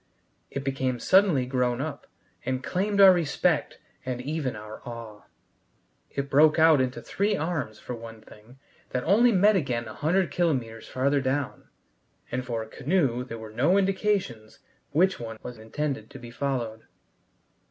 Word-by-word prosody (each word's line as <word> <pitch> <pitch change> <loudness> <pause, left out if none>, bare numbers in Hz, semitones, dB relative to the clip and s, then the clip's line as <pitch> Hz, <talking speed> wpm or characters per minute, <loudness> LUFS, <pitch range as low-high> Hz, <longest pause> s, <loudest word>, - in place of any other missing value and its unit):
It 140 - -5
became 130 -2 -1
suddenly 185 - +4
grown 125 -1 0
up, 145 0 -5 0.4
and 130 +1 -2
claimed 200 +5 -1
our 195 -1 +10
respect 170 -5 0 0.3
and 125 -1 -3
even 140 -1 -3
our 105 0 -9
awe. 115 -3 -9 0.8
It 140 0 -3
broke 150 +3 +5
out 160 -3 +6
into 130 0 -2
three 205 +1 0
arms, 150 -9 -3
for 125 - -7
one 115 -1 -9
thing, 110 +3 -17 0.4
that 125 - -1
only 230 +7 +5
met 205 +1 +5
again 125 -9 -1
a 110 - -7
hundred 175 - +1
kilometers 125 -10 -1
farther 140 +2 +1
down, 135 +2 -2 0.6
and 125 +1 -2
for 115 -3 -3
a - - -11
canoe 130 -1 0
there 115 -2 -7
were 110 -1 -9
no 170 - +3
indications 190 - -1 0.3
which 185 +6 +2
one 115 -2 -6
was 125 -2 -8
intended 140 +6 -4
to - - -10
be 120 -2 -10
followed. 120 -4 -3
135 Hz, 155 wpm, -26 LUFS, 120-165 Hz, 0.8 s, our